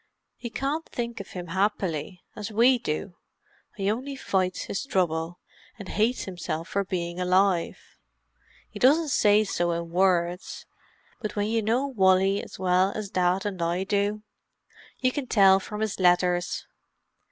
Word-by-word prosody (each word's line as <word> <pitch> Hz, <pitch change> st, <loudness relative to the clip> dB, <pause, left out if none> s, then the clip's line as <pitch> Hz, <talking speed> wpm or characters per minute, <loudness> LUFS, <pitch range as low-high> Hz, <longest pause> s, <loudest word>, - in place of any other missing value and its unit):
He 235 Hz, -, -7 dB
can't 285 Hz, +7 st, -3 dB
think 235 Hz, -1 st, -4 dB
of 200 Hz, -, -9 dB
him 180 Hz, -2 st, -6 dB
happily, 190 Hz, -2 st, -1 dB
as 210 Hz, +1 st, -6 dB
we 240 Hz, +4 st, +4 dB
do; 175 Hz, -1 st, -4 dB, 0.6 s
he 200 Hz, 0 st, 0 dB
only 265 Hz, +5 st, -4 dB
fights 185 Hz, -7 st, -1 dB
his 195 Hz, -, -4 dB
trouble, 175 Hz, -, -1 dB, 0.4 s
and 200 Hz, -3 st, -9 dB
hates 225 Hz, +4 st, +1 dB
himself 170 Hz, -3 st, -5 dB
for 200 Hz, -, 0 dB
being 175 Hz, -2 st, -4 dB
alive. 185 Hz, -1 st, +2 dB, 0.9 s
He -, -, -10 dB
doesn't 300 Hz, +5 st, +4 dB
say 210 Hz, -4 st, +4 dB
so 175 Hz, -4 st, -1 dB
in 170 Hz, 0 st, -4 dB
words, 180 Hz, -1 st, 0 dB, 0.6 s
but 215 Hz, -, -4 dB
when 205 Hz, -1 st, 0 dB
you 225 Hz, +1 st, 0 dB
know 230 Hz, +6 st, +1 dB
Wally 195 Hz, -5 st, +3 dB
as -, -, -10 dB
well 185 Hz, +1 st, +2 dB
as 210 Hz, -2 st, -5 dB
Dad 180 Hz, +1 st, +1 dB
and 190 Hz, -4 st, -3 dB
I 170 Hz, +2 st, 0 dB
do, 205 Hz, +2 st, -1 dB, 0.8 s
you 255 Hz, 0 st, +3 dB
can 275 Hz, -1 st, -4 dB
tell 195 Hz, -4 st, +5 dB
from 210 Hz, +2 st, -7 dB
his 220 Hz, -3 st, -2 dB
letters. 180 Hz, -1 st, +2 dB
195 Hz, 150 wpm, -26 LUFS, 180-220 Hz, 0.9 s, tell